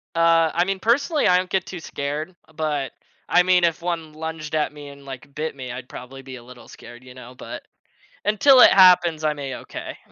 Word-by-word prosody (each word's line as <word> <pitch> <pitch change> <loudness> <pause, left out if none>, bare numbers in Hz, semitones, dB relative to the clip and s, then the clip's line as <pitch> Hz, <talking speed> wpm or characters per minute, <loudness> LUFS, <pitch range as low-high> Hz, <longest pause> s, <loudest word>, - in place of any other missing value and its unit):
Uh, 165 -1 +3
I 175 +1 +1
mean, 195 0 -3
personally, 280 - +1
I 180 - +5
don't 185 0 -2
get 190 - -1
too 180 - -8
scared, 150 +3 -5 0.2
but, 150 -4 -2 0.4
I 180 - +4
mean, 180 -1 +3
if 170 0 +1
1 165 -3 -4
lunged 160 -1 -6
at 150 -1 0
me 145 -1 -11
and, 140 0 -14
like, 135 +1 -10
bit 155 0 -4
me, 130 -2 -7
I'd 125 +1 -9
probably 135 +1 -10
be 130 -1 -10
a 120 - -14
little 125 0 -15
scared, 120 +1 -14
you 125 0 -13
know? 125 0 -13
But, - - -9 0.6
until 250 +6 +5
it - - +8
happens, 175 -4 +5
I'm 150 -1 -1
a-okay. 135 -2 -7
155 Hz, 210 wpm, -22 LUFS, 135-180 Hz, 0.6 s, it